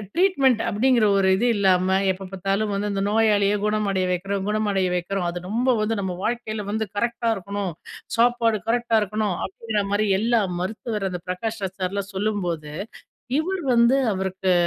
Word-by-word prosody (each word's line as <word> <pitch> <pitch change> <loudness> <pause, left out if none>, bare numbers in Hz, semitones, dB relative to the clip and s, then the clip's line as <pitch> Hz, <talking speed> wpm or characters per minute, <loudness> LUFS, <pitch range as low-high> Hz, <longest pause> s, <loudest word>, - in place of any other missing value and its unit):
Treatment 280 - +3
அப்டிங்கிற 235 +1 +3
ஒரு 195 -1 +3
இது 215 +6 0
இல்லாம 190 -1 +3
எப்ப 190 +1 -6
பாத்தாலும் 195 +3 -1
வந்து 205 +1 -1
அந்த 195 -1 -1
நோயாளிய 210 -2 +3
குணமடைய 210 -3 +1
வக்கிறோம், 195 +2 -2
குணமடைய 205 -3 +1
வக்கிறோம். 180 +1 -2
அது 175 +1 -4
ரொம்ப 235 +6 0
வந்து 215 +1 0
நம்ம 190 -2 -2
வாழ்க்கையில 220 -3 -2
வந்து 220 +1 -1
கரெக்டா 235 +1 0
இருக்கணும், 200 0 -4 0.5
சாப்பாடு 230 -2 +3
கரெக்ட்டா 235 -1 +2
இருக்கணும் 210 -1 -1
அப்டிங்கிற 210 +2 -2
மாரி 210 +1 +2
எல்லா 230 +1 +2 0.2
மருத்துவர், 210 +2 -3
அந்த 180 -1 -5
பிரகாஷ்ராஜ் 190 0 -4
சார்லாம் 195 +2 -2
சொல்லும்போது, 180 -7 -2 0.7
இவர் 370 +3 -2
வந்து 235 +3 +5 0.2
அவருக்கு 190 0 0
205 Hz, 145 wpm, -23 LUFS, 190-225 Hz, 0.7 s, வந்து